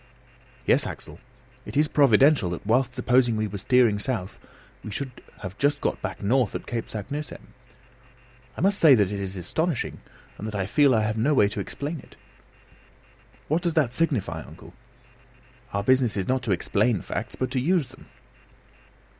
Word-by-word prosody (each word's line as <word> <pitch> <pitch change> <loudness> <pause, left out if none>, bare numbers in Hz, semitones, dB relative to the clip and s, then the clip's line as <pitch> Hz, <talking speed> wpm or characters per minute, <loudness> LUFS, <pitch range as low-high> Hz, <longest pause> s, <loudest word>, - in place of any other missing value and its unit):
"Yes, - - +3
Axel, - - -9 0.4
it - - -6
is 150 +1 +4
providential 140 - +4
that 85 +2 -6
whilst 125 +3 +1
supposing 125 -2 +2
we 110 - 0
were 100 -1 -5
steering 115 0 +3
south 105 -5 -2 0.4
we - - -7
should 125 +4 -6 0.2
have 95 0 -7
just 145 +1 +2
got - - -2
back - - -5
north 120 +1 +2
at - - -5
Cape 115 -2 -4
Saknussemm. 140 +7 -6 1.0
I - - -4
must 195 +2 +2
say 150 -5 +8
that 100 -5 +2
this 100 0 -4
is 95 0 -5
astonishing, 160 - -2 0.4
and 105 - -5
that 110 - -5
I 95 -2 -1
feel 135 +5 +4
I 110 - +2
have 110 +1 -1
no 145 +6 +2
way 105 - +5
to 105 - -5
explain 150 +3 -4
it." - - -17 1.3
"What 160 +4 +1
does 170 -2 -1
that 140 -7 +2
signify, 120 - -1
uncle? 80 +3 -13 1.0
Our 100 0 -1
business 130 -1 +2
is 95 - -2
not 130 0 +1
to - - +3
explain 100 +3 +1
facts, - - -5
but 130 - -3
to 130 - 0
use 165 +3 +2
them!" - - -17
125 Hz, 175 wpm, -25 LUFS, 105-140 Hz, 1.3 s, say